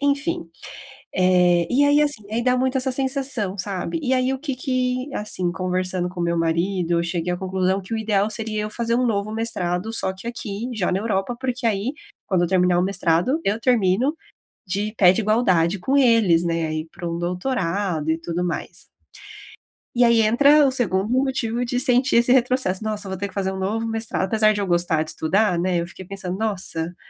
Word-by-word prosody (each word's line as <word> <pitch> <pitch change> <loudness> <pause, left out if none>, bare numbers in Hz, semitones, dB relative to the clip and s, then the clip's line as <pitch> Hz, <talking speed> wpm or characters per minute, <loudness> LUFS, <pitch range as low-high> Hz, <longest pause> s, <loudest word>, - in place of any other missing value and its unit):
enfim. 285 - -1 0.7
Eh, 180 -2 +3
e 280 +3 +4
aí, 290 +1 +4
assim 290 -7 0
aí 235 +2 0
dá 250 0 +2
muito 260 +1 +1
essa 260 +1 0
sensação, 260 -7 -1
sabe, 195 - -3
e 260 -1 0
aí 255 +1 +1
o 265 - -3
que 275 -2 -4
que 255 +1 -1
assim, 185 -4 -2
conversando 185 0 -1
com 180 0 -11
o - - 0
meu 170 0 0
marido, 170 +2 0
eu 170 - +1
cheguei 170 0 -2
à 175 - -2
conclusão 190 +1 -1
que 195 +5 -10
o - - -1
ideal 210 -1 +1
seria 215 -1 -2
eu 210 - -4
fazer 235 +1 -1
um 250 +1 +2
novo 210 -1 -1
mestrado, 220 -3 -2
só 190 -4 -1
que 190 +4 -12
aqui, 235 0 -5
já 195 -5 0
na 185 - 0
Europa 210 +2 -2
porque 255 -1 -2
aí, 220 +4 0 0.3
quando 185 -3 +1
eu 175 - +1
terminar 180 -1 +3
o - - +2
mestrado, 185 - +1
eu 210 +3 0
termino 240 - +2 0.5
de 200 +3 -2
pé 180 -3 +7
de 220 - -1
igualdade 200 -5 +2
com 265 +10 0
eles, 225 -10 +4
né, 165 -1 -1
aí 155 +1 -3
pra 175 -2 -6
um 170 0 -3
doutorado 180 - -2
e 160 - 0
tudo 170 +1 -3
mais. 175 - -5 1.1
E 245 - +4
aí 235 -1 +5
entra 285 +7 +5
o 265 - +2
2º 205 -6 0
motivo 255 -2 0
de 245 +1 -1
sentir 255 +1 +2
esse 240 +1 +3
retrocesso: 250 -6 +2
"Nossa, 210 -2 -3
eu 190 - -6
vou 190 - -4
ter 200 +1 -3
que - - -14
fazer 190 -1 -1
um 190 - -5
novo 215 +4 -2
mestrado" 225 -3 -1
apesar 215 +2 +3
de 205 - -3
eu - - -1
gostar 175 -2 +1
de 155 - -4
estudar, 180 +2 +1
né, 180 -1 0
eu 170 - -5
fiquei 185 +1 -10
pensando: 190 -1 -4
"Nossa, 180 -6 -3
205 Hz, 210 wpm, -22 LUFS, 180-245 Hz, 1.1 s, pé